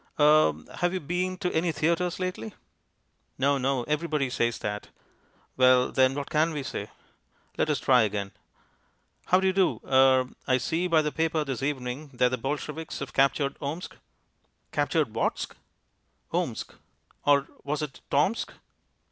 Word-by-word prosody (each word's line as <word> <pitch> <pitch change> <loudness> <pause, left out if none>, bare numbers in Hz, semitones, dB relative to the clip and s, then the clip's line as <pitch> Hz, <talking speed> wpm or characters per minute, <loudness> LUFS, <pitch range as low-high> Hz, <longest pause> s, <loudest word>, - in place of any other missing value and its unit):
"Er 150 - +6 0.2
have 175 +1 0
you - - -1
been 180 +3 -2
to 180 -2 -2
any 165 +1 +1
theatres 170 +4 0
lately?" 180 - -4 0.8
No, 140 +1 +2
no, 130 -1 0
everybody 150 -2 -1
says 120 -2 0
that. 105 0 -4 0.7
Well, 130 0 +5
then, 130 0 +3
what 145 -1 -5
can 160 +2 +2
we 145 -2 -3
say? - - -5 0.7
Let - - 0
us 150 - +1
try 125 -2 +4
again. 100 -2 -1 1.0
"How 185 - +5
do 190 - -1
you 190 - +3
do. 190 -1 +2
Er 130 -1 +5 0.2
I 130 - +4
see 165 +7 -1
by 160 -3 +3
the 150 - -1
paper 160 0 0
this 135 -4 -4
evening 135 +1 -3
that 125 0 +3
the 130 - -2
Bolsheviks 150 +4 -4
have 140 - -6
captured 140 +1 +2
Omsk." 155 +5 -5 0.8
"Captured - - 0
Whatsk?" - - -2 0.8
"Omsk." - - -2 0.5
Or 140 -1 +4 0.2
was 150 +1 -2
it 145 -3 -7
Tomsk? 155 +11 +1
145 Hz, 150 wpm, -27 LUFS, 130-160 Hz, 1.0 s, Er